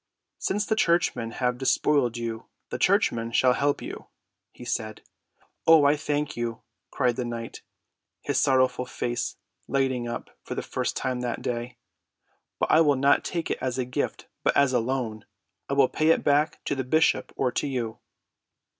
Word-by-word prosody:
"Since 205 +2 0
the 220 - +1
churchmen 170 - +1
have 125 +1 -1
despoiled 130 -1 +2
you, 115 -1 -5 0.2
the - - -3
churchmen 115 0 +2
shall 125 +2 +4
help 140 +4 0
you," - - -8 0.4
he - - -12
said. 110 0 -3 0.6
"Oh, 160 -3 +7
I 145 +1 +5
thank 150 0 -2
you," 120 -1 -4 0.3
cried 125 -3 0
the 125 - -1
knight, 120 -1 -6 0.6
his - - 0
sorrowful 130 -1 +2
face 120 0 -3 0.3
lighting 130 -3 0
up 120 - -6
for - - -6
the - - -3
first - - -2
time 130 -2 -2
that 120 -1 -3
day. 120 0 -3 0.8
"But - - 0
I 160 - +6
will 145 -3 +4
not 140 +2 +3
take 170 -2 -3
it - - -2
as 130 -1 -2
a 130 - 0
gift 125 - -3 0.2
but - - +2
as 140 -2 +4
a 125 - +4
loan. 115 -3 -2 0.5
I - - 0
will 140 -1 +5
pay 155 - 0
it 165 - +4
back 150 +2 +2
to - - 0
the 135 -2 -2
bishop 155 +6 +2
or 130 -2 0
to - - -1
you." 120 -5 -3
130 Hz, 175 wpm, -26 LUFS, 120-145 Hz, 0.8 s, Oh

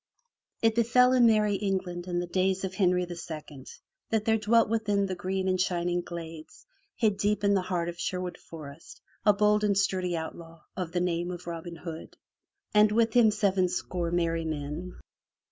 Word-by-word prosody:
T 225 - +6
BEFELL 245 +3 +4
in 245 -2 +6
merry 215 -2 +3
England 185 -3 -3
in 175 -1 -2
the 175 - -1
days 185 +2 0
of 190 -1 -3
Henry 180 -2 +2
II 160 -6 -8 0.4
that 220 -1 0
there 220 0 +3
dwelt 225 +2 +3
within 210 -2 +1
the 190 - -3
green 185 +1 -2
and 185 -1 +1
shining 175 -1 0
glades 165 -2 -9 0.3
hid 215 -4 +1
deep 205 +1 0
in 200 0 +4
the 195 - +2
heart 180 -2 -2
of 175 0 -6
Sherwood 180 -1 -3
Forest, 155 -1 -11 0.3
a - - +9
bold 210 +1 +3
and 200 -2 +2
sturdy 185 -3 0
outlaw 165 +1 -8
of 180 -3 -4
the 175 0 0
name 175 0 -1
of 180 0 -7
Robin 170 0 -6
Hood, 165 -1 -8 0.6
and 210 0 +5
with 225 0 +2
him 240 -3 +6
sevenscore 185 -4 0
merry 165 -1 0
men. 155 +3 -5
185 Hz, 175 wpm, -28 LUFS, 170-210 Hz, 0.6 s, a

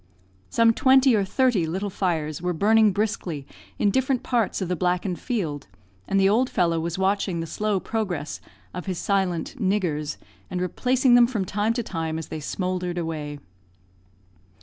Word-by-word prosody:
Some 230 0 +4
twenty 265 +1 +5
or 205 - +2
thirty 215 -4 +1
little 190 +5 -3
fires 160 -5 -2
were 180 0 -1
burning 215 +4 +4
briskly 185 -8 -2 0.3
in 205 - +2
different 260 +2 +1
parts 235 -5 0
of 190 - -2
the 180 - -1
blackened 180 +1 -1
field, 165 - -3 0.4
and 195 - +2
the 195 - +5
old 240 +6 +3
fellow 170 -2 +1
was 170 +1 -3
watching 190 -2 0
the 165 - -3
slow 205 +4 -1
progress 185 -9 -3 0.3
of 180 +2 -6
his 185 -2 -2
silent 190 +4 -1
"niggers," 180 -8 -1 0.3
and 180 - -3
replacing 250 +8 +2
them 240 -1 +7
from 220 -6 -2
time 210 +4 0
to 240 0 -2
time 160 -5 -3
as 160 - -6
they 160 - -5
smouldered 180 +2 -3
away. 155 -3 -4
190 Hz, 165 wpm, -24 LUFS, 170-220 Hz, 0.4 s, them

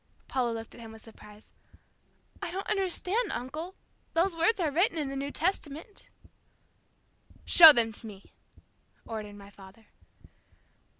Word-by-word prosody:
Paula 250 -3 -1
looked 225 0 -7
at - - -13
him 225 -1 -10
with 220 - -15
surprise. 210 -1 -16 0.9
"I - - -4
don't 380 +3 -5
understand, 400 +2 -1
uncle. 310 +9 -6 0.4
Those 340 +2 +1
words 340 +7 +2
are 320 -4 0
written 340 +3 +1
in 295 -3 -3
the 275 - -6
New 275 +1 -4
Testament." 330 +2 -4 1.4
"Show 325 -2 +10
them 235 -5 +2
to 220 +1 -5
me," 200 -2 -14 0.7
ordered 215 -2 -7
my 200 0 -14
father. 195 +3 -17
280 Hz, 135 wpm, -28 LUFS, 225-350 Hz, 1.4 s, Show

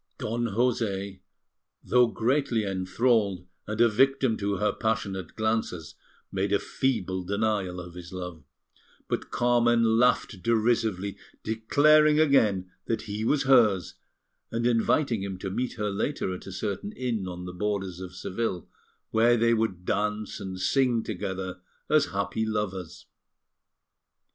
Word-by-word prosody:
Don 120 +2 -2
José, 100 -4 -1 0.6
though 125 -1 +4
greatly 120 -1 0
enthralled 100 0 +1 0.2
and 105 +1 -4
a 120 - +7
victim 130 +1 +2
to 100 0 -1
her 105 +3 +1
passionate 100 -6 -2
glances, 110 -7 -2 0.4
made 95 +1 -1
a 100 - +4
feeble 100 -8 -1
denial 100 -2 -1
of 90 -1 -9
his 85 -1 -10
love, 90 -4 -7 0.6
but - - -3
Carmen 120 -2 +3
laughed 120 -5 +2
derisively, 110 -4 +1 0.3
declaring 150 +8 +4
again 105 -12 +3 0.2
that 115 - -1
he 105 0 -4
was 140 +5 +2
hers, 110 - +4 0.6
and 115 +1 -1
inviting 120 0 +2
him 95 -1 -4
to 95 +1 -5
meet 125 +5 -2
her 105 -3 -2
later 100 -1 -2
at 90 - -9
a - - -6
certain 100 - -4
inn 115 - -2
on 90 0 -6
the 90 - -7
borders 95 -1 -2
of 90 -1 -8
Seville, 95 -2 -3 0.4
where 120 +2 +4
they 115 +1 +3
would 110 -6 -1
dance 105 +2 -1
and 95 -1 -6
sing 120 +2 +2
together 95 -2 -4 0.3
as 155 -1 +5
happy 100 +2 -2
lovers. 105 -5 -3
105 Hz, 135 wpm, -27 LUFS, 95-120 Hz, 0.6 s, a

